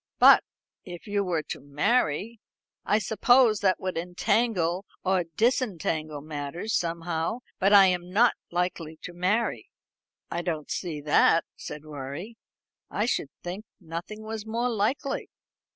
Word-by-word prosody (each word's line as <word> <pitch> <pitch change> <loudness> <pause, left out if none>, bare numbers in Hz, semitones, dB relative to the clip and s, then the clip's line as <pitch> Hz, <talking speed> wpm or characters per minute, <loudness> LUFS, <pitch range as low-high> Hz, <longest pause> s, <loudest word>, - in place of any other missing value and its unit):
"But - - +8 0.4
if 175 -2 -9
you 205 -1 0
were 170 -5 -1
to - - -6
marry 185 - 0 0.2
" - - -67
"I 210 - +3
suppose 220 +1 +4
that 190 -2 +2
would 185 -3 -2
entangle 180 0 0 0.2
or 185 -2 +2
disentangle 170 - 0
matters 155 +7 -5
somehow. 170 +5 -2 0.2
But 195 +1 +3
I 200 -1 +9
am 180 -1 0
not 230 +6 +4 0.2
likely 170 -2 -2
to 180 - -7
marry." 190 +7 0 0.6
"I 170 - -1
don't 160 -4 -3
see 160 -5 -3
that," 150 +2 +4
said 150 +1 -8
Rorie. 150 - -7 0.5
"I 210 - 0
should 190 - -1
think 180 +4 -5 0.2
nothing 175 +5 -7
was 220 -1 -5
more 230 +3 -1
likely." 235 +5 -1
180 Hz, 135 wpm, -27 LUFS, 165-215 Hz, 0.6 s, I